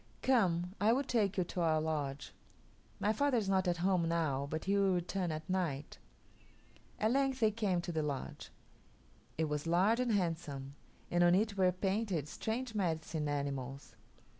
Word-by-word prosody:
Come, 185 -8 +2
I 220 +3 +5
will 270 +3 +1
take 215 -7 0
you 185 - +3
to 175 +1 -4
our 160 -2 +3
lodge. 145 -3 -3 0.7
My 210 - +2
father 285 +2 +2
is 210 -4 0
not 190 -1 +2
at 175 -1 +1
home 180 -4 +2
now, 145 -5 0
but 155 +1 -4
he 200 +1 +2
will 195 -2 +3
return 180 0 -1
at 155 0 -5
night." 165 -6 -2 1.0
At 215 +1 +2
length 270 0 +1
they 220 -2 +4
came 200 -5 0
to 175 - -4
the 160 -2 -1
lodge. 145 -3 -4 0.9
It 160 - +1
was 150 +1 -3
large 190 +8 +3
and 250 -2 +1
handsome, 160 -8 -2 0.4
and 175 0 +3
on 175 0 +6
it 205 +1 +1
were 185 -2 +4
painted 190 -4 -1
strange 225 +8 -3
medicine 160 -5 -1
animals. 140 -3 -4
180 Hz, 170 wpm, -34 LUFS, 155-205 Hz, 1.0 s, on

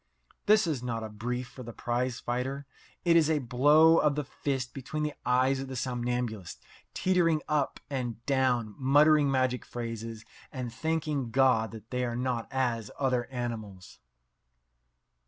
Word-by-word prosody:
This 215 0 +6
is 150 -7 -1
not 115 -2 -3
a 110 - -5
brief 125 +4 -4
for 130 - -11
the 120 -1 -8
prize 120 +1 -2
fighter. 130 +3 -3 0.4
It 170 -1 +5
is 160 -2 +5
a 160 - +3
blow 145 +6 +5
of 150 -2 +2
the 150 - -1
fist 135 -2 -3
between 145 +3 -4
the 150 -1 -2
eyes 130 +2 +3
of 135 - -5
the 130 - -6
somnambulists, 120 -5 -3 0.4
teetering 170 -4 +2
up 150 -3 0
and 120 -4 -4
down, 125 -5 +1
muttering 145 +2 +5
magic 130 -2 +1
phrases, 115 -1 -6 0.3
and 125 -4 -5
thanking 150 -2 -1
God 125 -3 +3
that 110 0 -12
they 125 0 -1
are 120 -1 -2
not 125 -2 -2
as 120 -5 -1
other 130 -3 +1
animals. 110 -7 -6
125 Hz, 155 wpm, -29 LUFS, 120-145 Hz, 0.4 s, This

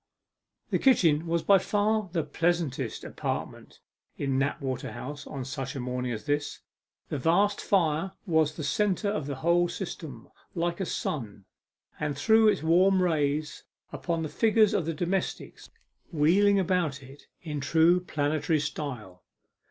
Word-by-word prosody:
The - - +2
kitchen 170 - +3
was 170 0 0
by 195 -1 +5
far 210 +1 0
the 165 -3 0
pleasantest 160 -9 -1
apartment - - -5 0.4
in 135 -2 0
Knapwater 135 -1 -2
House 145 +1 -7
on 135 -2 -6
such 135 0 -5
a - - -3
morning 125 0 -3
as 110 +1 -5
this. 145 0 -2 0.5
The 145 - -3
vast 195 +8 +2
fire 175 -1 +1
was 160 -4 +2
the 155 - -5
centre 205 +5 0
of 155 -9 -3
the 140 - -3
whole 175 +1 +3
system, 160 -9 -7 0.3
like 170 +1 -1
a 190 - -2
sun, 105 -9 -4 0.5
and 145 -2 -2
threw 220 +9 +4
its 210 -8 +2
warm 185 +4 +4
rays 150 -3 -1 0.3
upon 165 -2 -2
the 155 - -3
figures 220 +1 +3
of 165 - 0
the 165 - -1
domestics, 180 +4 -3 0.4
wheeling 185 +6 +4
about 175 -7 0
it 135 +2 -15 0.2
in 150 -3 -4
true 165 +5 +4
planetary 155 -2 0
style. 130 -11 -5
160 Hz, 145 wpm, -28 LUFS, 140-180 Hz, 0.5 s, by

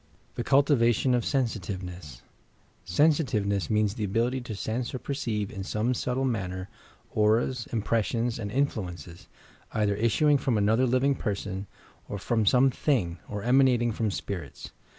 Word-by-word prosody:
THE 120 - -3
CULTIVATION 130 -3 +3
OF 120 -1 +2
SENSITIVENESS 90 - -3 0.6
"SENsmvENESS" 105 - +2
means 105 -2 +2
the 110 -2 -4
ability 115 +6 0
to 120 -3 -6
sense 115 +5 -3
or - - -1
perceive 115 -7 -3
in 95 - -6
some 110 +5 0
subtle 125 +2 -1
manner, 95 -6 -3 0.4
auras, 115 +3 +1
impressions 115 +1 0
and 105 -3 -4
influ 110 -7 -1
ences, 85 -1 -12 0.5
either 105 -2 +1
issuing 115 +8 +3
from 125 -3 0
another 110 +5 +3
living 130 +3 +2
person, 100 -5 -4 0.4
or 100 - -3
from 110 +2 0
some 130 +4 +5
thing, 95 - 0
or 105 -1 -4
emanating 125 -1 +4
from 110 0 -1
"spirits." 90 -5 -6
115 Hz, 140 wpm, -27 LUFS, 100-125 Hz, 0.6 s, some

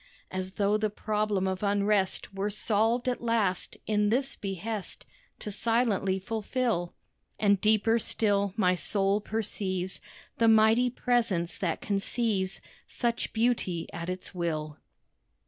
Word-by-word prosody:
As 185 0 -4
though 205 +1 +2
the 215 0 0
problem 210 -2 -1
of 190 0 -2
unrest 200 -1 +1
Were 195 +2 -1
solved 220 +4 +1
at 250 - 0
last, 225 -6 0
in 210 -1 +2
this 265 +5 +1
behest 200 +1 -4 0.3
To 210 - -5
silently 210 -3 +1
fulfil; 220 -2 -2 0.4
And 200 -2 +3
deeper 220 +2 +3
still, 200 -3 +1
my 185 -4 +4
soul 195 +2 +1
perceives 195 -4 -2 0.4
The 230 - +4
mighty 225 +3 +5
Presence 230 -9 0
that 175 -6 -1
conceives 200 -1 -1 0.3
Such 235 -1 -1
beauty 220 -7 0
at 170 0 -5
Its 185 +1 -5
will. 155 -4 -3
205 Hz, 125 wpm, -29 LUFS, 190-225 Hz, 0.4 s, mighty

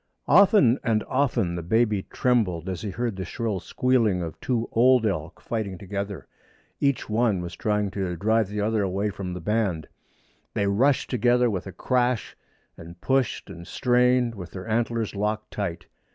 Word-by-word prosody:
Often 175 - +5
and 110 -3 +1
often 130 -10 0
the 85 - -3
baby 105 +2 +1
trembled 100 -9 +1
as 95 -2 -4
he 105 - -4
heard 115 +2 -2
the 95 - -3
shrill 105 +1 -3
squealing 115 -4 +1
of 80 -2 -7
two 120 -2 -1
old 125 0 +4
elk 100 -3 -3
fighting 105 -5 -4
together. 100 -3 -5 0.5
Each 140 -2 +1
one 110 -3 +1
was 85 0 -6
trying 105 -3 0
to 95 -3 -3
drive 110 +4 +1
the 105 +1 -3
other 110 +1 +1
away 100 +2 -1
from 95 -2 -5
the - - -5
band. 95 -4 -1 0.7
They 100 - +1
rushed 125 +8 +2
together 125 0 +3
with 95 -1 -4
a - - -6
crash, 125 +1 0 0.4
and 85 +1 -12
pushed 135 +1 0
and 85 +1 -10
strained, 125 -1 +2
with 90 -6 -8
their 95 +2 -7
antlers 115 0 -1
locked 105 +1 -2
tight. 95 -5 -4
105 Hz, 165 wpm, -25 LUFS, 95-120 Hz, 0.7 s, Often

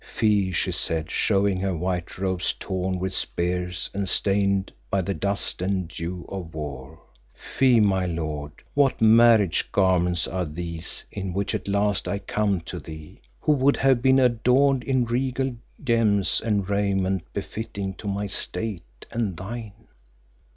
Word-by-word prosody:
"Fie!" 105 -3 +1
she - - 0
said, 80 -1 -2
showing 100 -1 +2
her 95 -2 -1
white 90 0 -3
robes 95 -1 0
torn 95 -1 -2
with 95 +1 -3
spears 90 +1 -2
and 100 -2 -1
stained 100 0 +2 0.2
by 100 - +1
the 95 +1 -1
dust 100 +2 -2
and 95 -2 -1
dew 85 +1 -5
of 90 -5 -7
war; 75 0 -7 0.4
"Fie, 130 -3 +3
my 95 -3 +3
lord, 75 -3 -3 0.2
what 140 -2 +3
marriage 110 -4 +5
garments 90 -2 +2
are 90 -1 -2
these 85 +1 -5
in 95 -3 -4
which 100 +1 -1
at - - -3
last 100 0 +1
I 100 - -1
come 100 -2 0
to 90 +1 -7
thee, 80 0 -11 0.2
who - - +2
would 140 -1 +3
have 135 -3 +3
been 130 +1 +5
adorned 125 +2 +3
in 130 -3 +2
regal 130 +2 -1 0.3
gems 110 -6 +2
and 105 -4 0
raiment 95 -2 0
befitting 100 -1 -4
to 105 - -6
my 100 +1 -1
state 95 - -4
and 110 -7 -2
thine?" 110 +3 -6
95 Hz, 150 wpm, -25 LUFS, 90-110 Hz, 0.4 s, marriage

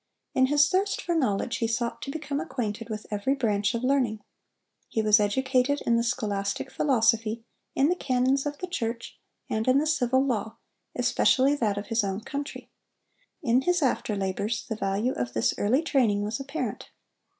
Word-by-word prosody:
In 260 0 +4
his 290 +1 +4
thirst 390 +2 0
for 345 - -2
knowledge 250 -7 0
he 230 - 0
sought 235 +1 -2
to - - -5
become 290 -1 -3
acquainted 235 -8 -4
with 215 -1 -5
every 210 +7 0
branch 215 -4 0
of 235 - -3
learning. 250 -5 +1 0.7
He - - -3
was 215 0 +6
educated 260 +6 +1
in 235 - +3
the 230 - +3
scholastic 210 -5 -2
philosophy, 230 -4 +1 0.3
in 275 - +4
the 355 - +2
canons 265 -1 +1
of 290 0 -4
the 365 - -4
church, 235 -10 -4 0.3
and 220 +2 -2
in 255 +1 +5
the 295 - +2
civil 265 -3 +2
law, 220 -4 -2 0.4
especially 270 +2 +3
that 220 -8 0
of 200 0 -5
his 225 -1 +2
own 195 +1 -2
country. 285 +5 -6 0.7
In 245 +2 +3
his 355 +2 +1
after 240 -4 0
labors 200 +3 -2
the 225 - -4
value 210 +4 -1
of 120 0 -3
this 110 - +1
early 250 +10 +2
training 230 -10 +2
was 215 +4 -3
apparent. 275 +3 -4
240 Hz, 175 wpm, -27 LUFS, 215-275 Hz, 0.7 s, was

